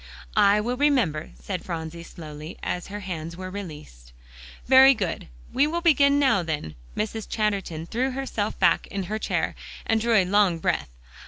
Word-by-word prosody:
"I 200 Hz, +1 st, +5 dB
will 240 Hz, +4 st, -2 dB
remember," 250 Hz, -, +1 dB
said 185 Hz, -3 st, -5 dB
Phronsie 165 Hz, -1 st, -5 dB
slowly, 155 Hz, -2 st, -9 dB
as 180 Hz, -, -3 dB
her 205 Hz, +1 st, -6 dB
hands 170 Hz, -3 st, -5 dB
were 185 Hz, 0 st, -6 dB
released. 150 Hz, -, -9 dB, 0.5 s
"Very 265 Hz, +1 st, +8 dB
good. 190 Hz, -6 st, -3 dB, 0.3 s
We 275 Hz, +3 st, +3 dB
will 340 Hz, +2 st, -2 dB
begin 285 Hz, -4 st, +5 dB
now 265 Hz, -9 st, +3 dB
then." 150 Hz, -, -4 dB, 0.2 s
Mrs. 220 Hz, 0 st, -3 dB
Chatterton 195 Hz, -7 st, -1 dB
threw 250 Hz, +9 st, -1 dB
herself 255 Hz, -6 st, -3 dB
back -, -, +3 dB
in 200 Hz, -2 st, -4 dB
her 215 Hz, +4 st, -3 dB
chair, -, -, -1 dB, 0.3 s
and 225 Hz, -1 st, +1 dB
drew 230 Hz, 0 st, +2 dB
a 195 Hz, -3 st, +5 dB
long 195 Hz, -2 st, +3 dB
breath. 160 Hz, -, -1 dB
200 Hz, 165 wpm, -25 LUFS, 170-240 Hz, 0.5 s, Very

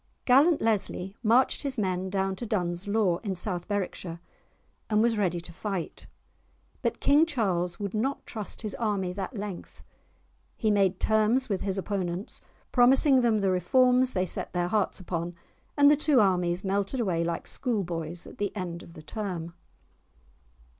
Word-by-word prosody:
Gallant 285 Hz, +6 st, +5 dB
Leslie 200 Hz, -3 st, -1 dB
marched 240 Hz, +3 st, +3 dB
his 275 Hz, -2 st, -3 dB
men 190 Hz, -2 st, -1 dB
down 190 Hz, 0 st, -1 dB
to 240 Hz, -, -5 dB
Duns 175 Hz, -3 st, -2 dB
Law, 200 Hz, -4 st, +2 dB
in 200 Hz, -4 st, -3 dB
South 180 Hz, -1 st, -1 dB
Berwickshire, 185 Hz, -4 st, -3 dB, 0.7 s
and 210 Hz, -1 st, +2 dB
was 235 Hz, -1 st, +2 dB
ready 180 Hz, -5 st, 0 dB
to 170 Hz, 0 st, -11 dB
fight. 195 Hz, -2 st, -5 dB, 0.7 s
But -, -, -1 dB
King 290 Hz, +3 st, +5 dB
Charles 185 Hz, -, -1 dB
would 200 Hz, -2 st, -4 dB
not 260 Hz, +6 st, -1 dB
trust 215 Hz, 0 st, -5 dB
his 215 Hz, -, -2 dB
army 200 Hz, -5 st, -1 dB
that 200 Hz, +5 st, -5 dB
length; 200 Hz, -3 st, -7 dB, 0.7 s
he 220 Hz, -, +1 dB
made 195 Hz, -2 st, +2 dB
terms 220 Hz, +4 st, +2 dB
with 195 Hz, -3 st, -1 dB
his 195 Hz, 0 st, -2 dB
opponents, 190 Hz, -1 st, -3 dB, 0.3 s
promising 260 Hz, +2 st, +5 dB
them 225 Hz, -3 st, +2 dB
the 195 Hz, -1 st, +2 dB
reforms 250 Hz, +8 st, +3 dB
they 185 Hz, -1 st, +1 dB
set -, -, -4 dB
their 175 Hz, -1 st, 0 dB
hearts 210 Hz, 0 st, 0 dB
upon, 175 Hz, -1 st, -4 dB, 0.4 s
and 285 Hz, 0 st, +7 dB
the -, -, +6 dB
two 295 Hz, -2 st, +3 dB
armies 180 Hz, -3 st, +2 dB
melted 200 Hz, +5 st, -1 dB
away 180 Hz, -7 st, 0 dB
like 170 Hz, 0 st, -3 dB
school 235 Hz, -6 st, -2 dB
boys 170 Hz, 0 st, -5 dB
at -, -, -13 dB
the 205 Hz, 0 st, -2 dB
end 175 Hz, -3 st, -4 dB
of 165 Hz, -, -13 dB
the 155 Hz, -, -12 dB
term. 175 Hz, -5 st, -5 dB
200 Hz, 165 wpm, -28 LUFS, 180-225 Hz, 0.7 s, and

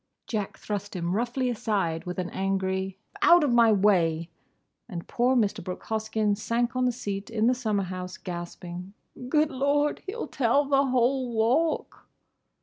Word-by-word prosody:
Jack 210 Hz, -4 st, -3 dB
thrust 205 Hz, -1 st, -5 dB
him 175 Hz, +1 st, -1 dB
roughly 245 Hz, +3 st, 0 dB
aside 205 Hz, -8 st, -1 dB
with 180 Hz, 0 st, -5 dB
an 180 Hz, -1 st, -3 dB
angry, 190 Hz, 0 st, -1 dB, 0.2 s
"Out 345 Hz, -1 st, +7 dB
of 285 Hz, -, +2 dB
my 235 Hz, -2 st, +6 dB
way!" 175 Hz, -5 st, +2 dB, 0.6 s
and 170 Hz, -5 st, -6 dB
poor 250 Hz, +2 st, +2 dB
Mr. 210 Hz, -4 st, +1 dB
Brooke 180 Hz, +1 st, -6 dB
Hoskyn 220 Hz, -1 st, 0 dB
sank 235 Hz, +4 st, -1 dB
on 255 Hz, 0 st, +2 dB
the 250 Hz, -, +3 dB
seat 205 Hz, -4 st, -5 dB
in 225 Hz, -1 st, 0 dB
the 250 Hz, -, +5 dB
summer 215 Hz, -5 st, -1 dB
house, 185 Hz, 0 st, -6 dB
gasping, 175 Hz, +1 st, -7 dB, 0.4 s
"Good 305 Hz, +2 st, +3 dB
Lord! 285 Hz, +2 st, +1 dB
He'll 455 Hz, +5 st, -4 dB
tell 275 Hz, +3 st, +2 dB
the 275 Hz, 0 st, +3 dB
whole 255 Hz, 0 st, +1 dB
Walk!" 245 Hz, +9 st, 0 dB
220 Hz, 155 wpm, -27 LUFS, 190-250 Hz, 0.6 s, Out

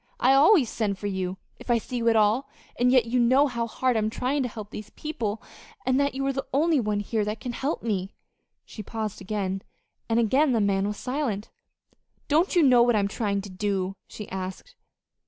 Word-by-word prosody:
"I 260 Hz, +2 st, +5 dB
always 290 Hz, -, +6 dB
send 210 Hz, -3 st, -2 dB
for 205 Hz, -, -8 dB
you 190 Hz, -2 st, -2 dB, 0.2 s
if -, -, -13 dB
I 240 Hz, -, +4 dB
see 245 Hz, +2 st, -5 dB
you 230 Hz, -1 st, +2 dB
at 225 Hz, -, +3 dB
all, 220 Hz, +5 st, +2 dB, 0.3 s
and 250 Hz, +1 st, +4 dB
yet 255 Hz, -3 st, +5 dB
you 245 Hz, +2 st, 0 dB
know 255 Hz, +4 st, +5 dB
how 235 Hz, -4 st, -2 dB
hard 255 Hz, +2 st, 0 dB
I'm 215 Hz, -1 st, +1 dB
trying 260 Hz, +5 st, -1 dB
to 250 Hz, -, -1 dB
help 215 Hz, -2 st, -9 dB
these 215 Hz, -1 st, -8 dB
people, 225 Hz, -7 st, -4 dB, 0.4 s
and 260 Hz, +1 st, +2 dB
that 280 Hz, -1 st, +1 dB
you 270 Hz, 0 st, -2 dB
are 275 Hz, -, 0 dB
the 270 Hz, 0 st, -4 dB
only 310 Hz, +2 st, +3 dB
one 210 Hz, -3 st, 0 dB
here 215 Hz, +1 st, -1 dB
that 210 Hz, +1 st, -3 dB
can 245 Hz, -, -4 dB
help 275 Hz, +6 st, -3 dB
me." 195 Hz, -4 st, -2 dB, 0.5 s
She 215 Hz, -, -9 dB
paused 215 Hz, 0 st, -5 dB
again, 195 Hz, -1 st, -2 dB, 0.5 s
and 225 Hz, +1 st, +3 dB
again 260 Hz, +5 st, +3 dB
the 230 Hz, -, +2 dB
man 200 Hz, -1 st, +1 dB
was 210 Hz, 0 st, -4 dB
silent. 250 Hz, -6 st, -3 dB, 0.8 s
"Don't 325 Hz, +7 st, +2 dB
you 345 Hz, -, +5 dB
know 250 Hz, -4 st, +6 dB
what 240 Hz, -1 st, +4 dB
I'm 200 Hz, -2 st, +2 dB
trying 200 Hz, -1 st, -1 dB
to 200 Hz, -, -9 dB
do?" 195 Hz, 0 st, -2 dB
she 210 Hz, -, -8 dB
asked. 190 Hz, -, -6 dB
230 Hz, 210 wpm, -26 LUFS, 205-260 Hz, 0.8 s, always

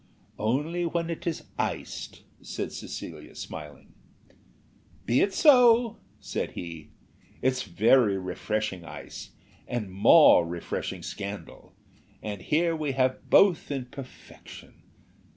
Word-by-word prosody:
"Only 150 Hz, +11 st, 0 dB
when 170 Hz, 0 st, -1 dB
it 165 Hz, -, -6 dB
is 165 Hz, -, -2 dB, 0.2 s
iced," -, -, -4 dB, 0.2 s
said -, -, -4 dB
Lady -, -, -14 dB
Cecilia, -, -, -8 dB
smiling. 75 Hz, -3 st, -9 dB, 1.1 s
"Be 120 Hz, +3 st, +3 dB
it 200 Hz, -, +2 dB
so," 245 Hz, -, +5 dB, 0.2 s
said -, -, -4 dB
he, 85 Hz, -3 st, -8 dB, 0.5 s
"very 115 Hz, -3 st, +3 dB
refreshing 95 Hz, +1 st, -3 dB
ice, -, -, -9 dB, 0.3 s
and 110 Hz, -6 st, -3 dB
more 100 Hz, -, +7 dB
refreshing 85 Hz, 0 st, -5 dB
scandal, 100 Hz, 0 st, -7 dB, 0.4 s
and 105 Hz, -3 st, -6 dB
here 165 Hz, -, +1 dB
we 150 Hz, -3 st, -2 dB
have 130 Hz, -1 st, 0 dB
both 190 Hz, -5 st, +5 dB
in 135 Hz, -3 st, -3 dB
perfection. 135 Hz, -2 st, -12 dB
130 Hz, 110 wpm, -27 LUFS, 100-165 Hz, 1.1 s, more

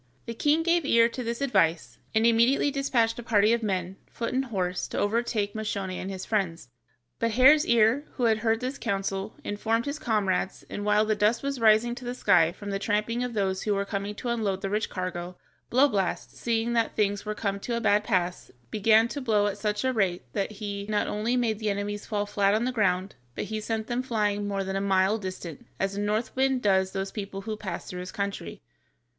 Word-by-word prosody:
The 230 Hz, -, -5 dB
king 295 Hz, +7 st, +2 dB
gave 340 Hz, 0 st, +2 dB
ear 230 Hz, -4 st, +5 dB
to 250 Hz, +1 st, -5 dB
this 235 Hz, +2 st, -3 dB
advice, 165 Hz, -, +1 dB, 0.2 s
and 220 Hz, +1 st, +4 dB
immediately 235 Hz, +5 st, +4 dB
despatched 245 Hz, -5 st, +1 dB
a -, -, -4 dB
party 215 Hz, -1 st, +3 dB
of 235 Hz, -, +2 dB
armed 220 Hz, -, -3 dB
men, 185 Hz, -1 st, -2 dB
foot 230 Hz, +1 st, -4 dB
and 265 Hz, +1 st, +1 dB
horse, 185 Hz, -6 st, -2 dB
to -, -, -6 dB
overtake 210 Hz, -1 st, 0 dB
Moscione 200 Hz, -3 st, -3 dB
and 190 Hz, -, -5 dB
his 190 Hz, -1 st, -5 dB
friends, 175 Hz, -, -2 dB, 0.5 s
but 230 Hz, -, +1 dB
Hare's 280 Hz, +6 st, +6 dB
ear, 235 Hz, +5 st, +4 dB
who 250 Hz, -, -2 dB
had 220 Hz, -2 st, +3 dB
heard 225 Hz, +1 st, +1 dB
this 260 Hz, +2 st, -4 dB
counsel, 195 Hz, +1 st, -2 dB
informed 225 Hz, +3 st, -1 dB
his 285 Hz, +1 st, -4 dB
comrades, 195 Hz, -6 st, -1 dB
and 205 Hz, -, -4 dB
while 210 Hz, +1 st, +3 dB
the 215 Hz, -, +2 dB
dust 210 Hz, +4 st, +1 dB
was 275 Hz, -2 st, -2 dB
rising 225 Hz, +1 st, +4 dB
to 250 Hz, +1 st, -9 dB
the 245 Hz, 0 st, -4 dB
sky 165 Hz, -9 st, +4 dB
from 200 Hz, +2 st, -7 dB
the 195 Hz, -, -1 dB
tramping 215 Hz, +4 st, 0 dB
of 245 Hz, -2 st, -4 dB
those 190 Hz, -2 st, 0 dB
who 210 Hz, -1 st, 0 dB
were 200 Hz, 0 st, -1 dB
coming 200 Hz, +1 st, -4 dB
to 240 Hz, -, -4 dB
unload 210 Hz, -5 st, -1 dB
the 195 Hz, -, -3 dB
rich 210 Hz, +1 st, 0 dB
cargo, 180 Hz, -1 st, -5 dB, 0.3 s
Blowblast, 235 Hz, -8 st, +1 dB
seeing 230 Hz, 0 st, -1 dB
that 230 Hz, -1 st, +1 dB
things 205 Hz, -1 st, 0 dB
were 215 Hz, 0 st, -4 dB
come 200 Hz, -2 st, -2 dB
to 235 Hz, +3 st, -2 dB
a -, -, 0 dB
bad 210 Hz, -2 st, +3 dB
pass, 180 Hz, -5 st, -1 dB, 0.2 s
began 220 Hz, +2 st, +4 dB
to 285 Hz, -, -5 dB
blow 215 Hz, -5 st, +2 dB
at 205 Hz, 0 st, -2 dB
such 210 Hz, +1 st, -1 dB
a 260 Hz, 0 st, +1 dB
rate 190 Hz, -6 st, 0 dB
that 200 Hz, +2 st, -2 dB
he 200 Hz, -1 st, -5 dB
not 210 Hz, -1 st, +1 dB
only 220 Hz, +4 st, -1 dB
made 225 Hz, -4 st, 0 dB
the 215 Hz, -1 st, -1 dB
enemies 205 Hz, +1 st, -3 dB
fall 205 Hz, -1 st, -1 dB
flat 205 Hz, -1 st, +2 dB
on 225 Hz, +3 st, 0 dB
the 255 Hz, -, 0 dB
ground, 195 Hz, -4 st, 0 dB, 0.2 s
but -, -, -2 dB
he 215 Hz, -, -2 dB
sent 220 Hz, 0 st, -2 dB
them 240 Hz, +1 st, -1 dB
flying 210 Hz, -5 st, -1 dB
more 200 Hz, -1 st, -1 dB
than 190 Hz, 0 st, -4 dB
a 195 Hz, -, 0 dB
mile 195 Hz, +2 st, +2 dB
distant, 185 Hz, -5 st, -7 dB
as 195 Hz, 0 st, -1 dB
a 205 Hz, -, -2 dB
north 215 Hz, +4 st, -1 dB
wind 265 Hz, -1 st, +1 dB
does 190 Hz, -2 st, +3 dB
those 195 Hz, 0 st, -3 dB
people 195 Hz, -2 st, -5 dB
who 215 Hz, +2 st, -4 dB
pass 190 Hz, -5 st, -6 dB
through 180 Hz, -, -6 dB
his 180 Hz, 0 st, -6 dB
country. 200 Hz, 0 st, -5 dB
210 Hz, 220 wpm, -27 LUFS, 195-235 Hz, 0.5 s, Hare's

